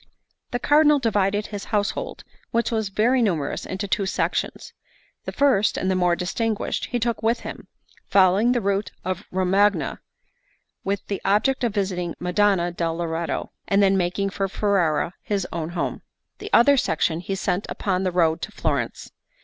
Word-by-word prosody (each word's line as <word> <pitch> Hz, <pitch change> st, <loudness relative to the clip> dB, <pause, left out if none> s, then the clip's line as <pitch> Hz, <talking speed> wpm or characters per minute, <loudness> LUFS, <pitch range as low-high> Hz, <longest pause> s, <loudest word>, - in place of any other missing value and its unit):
The 245 Hz, -, -1 dB
Cardinal 295 Hz, +3 st, +4 dB
divided 210 Hz, -4 st, +1 dB
his 205 Hz, -1 st, -6 dB
household, 215 Hz, -, -2 dB, 0.3 s
which 230 Hz, 0 st, 0 dB
was 220 Hz, -3 st, -1 dB
very 235 Hz, +6 st, +2 dB
numerous, 170 Hz, -11 st, -1 dB
into 190 Hz, +2 st, -4 dB
two 195 Hz, 0 st, 0 dB
sections. -, -, -2 dB, 0.5 s
The -, -, -3 dB
first, 265 Hz, -8 st, +2 dB
and 185 Hz, -, 0 dB
the -, -, +1 dB
more 180 Hz, -1 st, +2 dB
distinguished, 215 Hz, +5 st, -2 dB
he 245 Hz, -, -2 dB
took 235 Hz, -1 st, -1 dB
with 230 Hz, +2 st, +1 dB
him, -, -, -8 dB, 0.4 s
following 195 Hz, +4 st, +4 dB
the 245 Hz, -1 st, +1 dB
route 200 Hz, -1 st, 0 dB, 0.2 s
of 185 Hz, +1 st, -3 dB
Romagna, 190 Hz, +3 st, +1 dB, 0.8 s
with 200 Hz, 0 st, -2 dB
the 200 Hz, -, -4 dB
object 250 Hz, +7 st, +2 dB
of 230 Hz, -3 st, 0 dB
visiting 180 Hz, -4 st, -1 dB
Madonna 180 Hz, -1 st, +2 dB
del 165 Hz, -1 st, -2 dB
Loreto, 165 Hz, 0 st, -3 dB, 0.2 s
and 200 Hz, 0 st, +3 dB
then 195 Hz, 0 st, +4 dB
making 190 Hz, +2 st, 0 dB
for 195 Hz, 0 st, -1 dB
Ferrara, 185 Hz, -5 st, +1 dB
his 200 Hz, -3 st, -2 dB
own 160 Hz, -1 st, -3 dB
home. 175 Hz, 0 st, -3 dB, 0.4 s
The -, -, -7 dB
other 280 Hz, +4 st, +6 dB
section 165 Hz, -5 st, +1 dB
he 195 Hz, +2 st, -3 dB
sent 190 Hz, 0 st, -1 dB
upon 185 Hz, -2 st, -1 dB
the 185 Hz, -1 st, 0 dB
road 165 Hz, -2 st, +2 dB
to -, -, -5 dB
Florence. -, -, -2 dB
195 Hz, 165 wpm, -23 LUFS, 180-215 Hz, 0.8 s, other